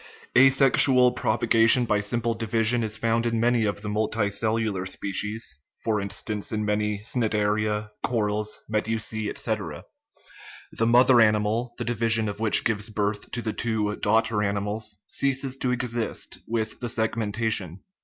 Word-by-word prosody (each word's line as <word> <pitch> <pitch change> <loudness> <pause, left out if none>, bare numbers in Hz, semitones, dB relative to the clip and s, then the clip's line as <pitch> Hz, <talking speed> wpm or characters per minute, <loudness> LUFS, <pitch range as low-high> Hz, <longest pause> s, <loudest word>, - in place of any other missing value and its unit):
A 135 +2 +8
sexual 135 -1 +5
propagation 115 +1 +3
by 105 -2 +1
simple 115 +3 -1
division 115 +1 0
is 110 0 -3
found 115 +1 0
in 115 -1 0
many 120 -1 +2
of 100 0 -3
the - - -5
multicellular 105 -1 -1
species 100 - -4 0.2
(for 110 -2 0
instance, 100 +2 -4
in 105 -1 -1
many 105 0 -1
cnidaria, 105 -2 0
corals, 105 -2 -1
medusae, 110 0 -2
etc.); 110 -6 -4 0.9
the 115 - 0
mother 125 +1 +6
animal, 110 +2 +1
the - - -3
division 115 -1 +1
of 100 0 -5
which 110 -1 +3
gives 110 -1 -1
birth 105 -1 -2
to 120 - -4
the 110 - -2
two 110 -3 -1
daugh 110 +2 +3
ter 110 -2 -2
animals, 105 +1 -2
ceases 135 -1 -1
to 130 - -1
exist 120 -2 -3
with 110 -1 -2
the 120 - -3
segmentation. 110 -5 -2
110 Hz, 145 wpm, -25 LUFS, 105-115 Hz, 0.9 s, A